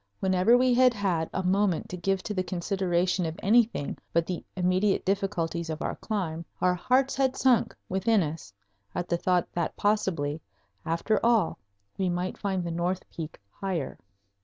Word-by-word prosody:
Whenever 190 +5 +4
we 255 0 +3
had 250 0 +5
had 180 -6 0
a 190 - -2
moment 190 -2 +1
to - - -6
give 190 +2 -1
to 210 - -3
the 185 - 0
consideration 180 0 0
of 160 +1 -6
anything 220 -7 +3 0.2
but 170 0 +2
the 180 -1 -4
immediate 185 +2 +2
difficulties 180 -4 -1
of 155 0 -3
our - - -2
climb 170 -7 -3 0.2
our 180 0 +3
hearts 255 +9 +2
had 265 -1 +1
sunk 255 -4 +3
within 195 +2 +2
us 155 +1 -6 0.4
at 175 - -2
the 175 - +1
thought 180 0 +1
that 170 -2 -2
possibly, 170 -8 0 0.5
after 170 +7 0
all, 230 -7 +3 0.4
we 190 -1 +1
might 180 +1 -2
find 190 -3 -1
the 170 - -3
north 175 +2 -2
peak 160 -1 -7
higher. 185 -8 -4
185 Hz, 165 wpm, -28 LUFS, 170-205 Hz, 0.5 s, had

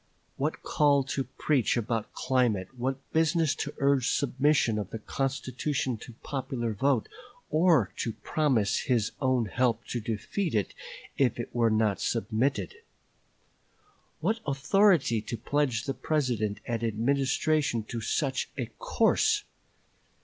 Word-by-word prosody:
What 150 +3 -2
call 145 -2 +3
to 135 0 -2
preach 135 -6 +1
about 115 -1 -2
climate, 115 -8 +1
what 130 +2 -1 0.2
business 160 -1 +3
to - - -3
urge 140 -3 +2
submission 140 -4 +2
of 100 -3 -4
the 115 - -5
constitution 135 +2 -2
to 120 - -11
popular 130 -5 -3
vote, 130 +2 +1 0.4
or 155 - +4
to 115 - -2
promise 130 -10 +1
his 115 -5 +1
own 130 -3 +2
help 115 +2 0
to 120 - -2
defeat 115 - -2
it 105 - 0 0.5
if 130 -3 +2
it 120 - -5
were 115 -1 +3
not 110 -2 +1
submitted; 120 - -1 1.4
what 225 +1 +1
authority 140 - +3
to 115 +2 -5
pledge 125 -1 0
the 135 - -2
President 125 -10 -1
and 115 -1 -2
Administration 130 +3 +1
to 115 +2 -5
such 135 +4 -1
a - - -1
course! 445 -3 +2
130 Hz, 130 wpm, -28 LUFS, 115-145 Hz, 1.4 s, or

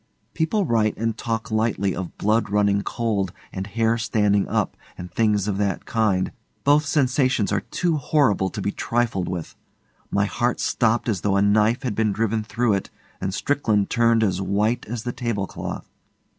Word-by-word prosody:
People 185 +5 +1
write 110 -4 +1
and 115 0 -1
talk 115 -1 -3
lightly 110 -3 0
of 90 -2 -6
blood 110 0 +1
running 100 0 +2
cold 100 -4 -1 0.2
and 95 +1 -4
hair 115 +2 +1
standing 105 -3 +2
up - - -1 0.2
and 90 0 -8
things 105 -3 +1
of 100 -1 -1
that 100 -3 -1
kind. 105 -5 +1 0.3
Both 145 +2 +4
sensations 130 -6 +2
are - - +2
too 170 -3 -1
horrible 130 -9 +2
to 105 - -6
be 100 - 0
trifled 115 -6 -1
with. 90 -3 -5 0.5
My 100 0 +1
heart 120 +4 -1
stopped 115 +1 +1
as 100 -7 0
though 100 -1 +1
a - - +3
knife 110 +5 +3
had 125 -5 -1
been 110 -1 +1
driven 110 +1 0
through 115 +1 0
it, 95 - -2 0.3
and 95 - -1
Strickland 110 -3 0
turned 115 -1 +3
as 95 -2 0
white 105 +5 0
as 115 0 -4
the 120 - -2
tablecloth. 110 -6 -4
110 Hz, 170 wpm, -23 LUFS, 100-120 Hz, 0.5 s, Both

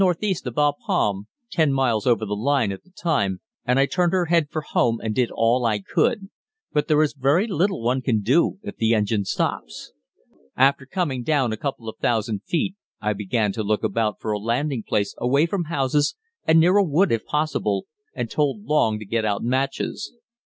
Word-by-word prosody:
E. 205 -3 0
of 120 - -5
Bapaume, 145 - 0 0.2
ten 160 -6 +2
miles 130 -5 +1
over 115 -3 +3
the 105 0 -2
line, 120 -1 +1
at 95 - -8
the - - -25
time, 140 - -1 0.3
and 125 +1 +2
I 135 - +5
turned 175 +4 0
her 185 -2 +2
head 165 -2 +2
for 155 -1 -4
home 115 -5 +1
and 110 -1 -3
did 125 +1 +1
all 115 +2 +1
I 110 -3 +2
could; 195 - 0 0.4
but 150 -1 +1
there 155 0 +4
is 150 - -1
very 140 +8 +2
little 190 - 0
one 125 +3 +1
can 115 -5 +1
do 135 - +2
if - - -7
the 115 0 +2
engine 105 -1 0
stops. - - -3 0.7
After 135 +1 +3
coming 145 -7 -2
down 130 -4 +1
a - - -1
couple 130 -3 -4
of 110 - -7
thousand 110 -3 0
feet 175 +2 0 0.3
I 105 0 0
began 105 +1 -1
to 110 - -4
look 105 +1 0
about 110 0 0
for 110 - -3
a 105 - -1
landing 120 +4 -1
place 100 -1 0
away 140 +6 +3
from 175 0 -2
houses 145 -2 0 0.3
and 160 +1 +6
near 180 +5 +5
a 205 - +5
wood 175 +3 +2
if 115 -1 0
possible, 155 +1 -1 0.3
and - - -2
told 150 +7 -1
Long 150 - +2
to 105 - -8
get 115 +3 -1
out 105 -2 -1
matches. 130 - -2
130 Hz, 200 wpm, -23 LUFS, 110-155 Hz, 0.7 s, and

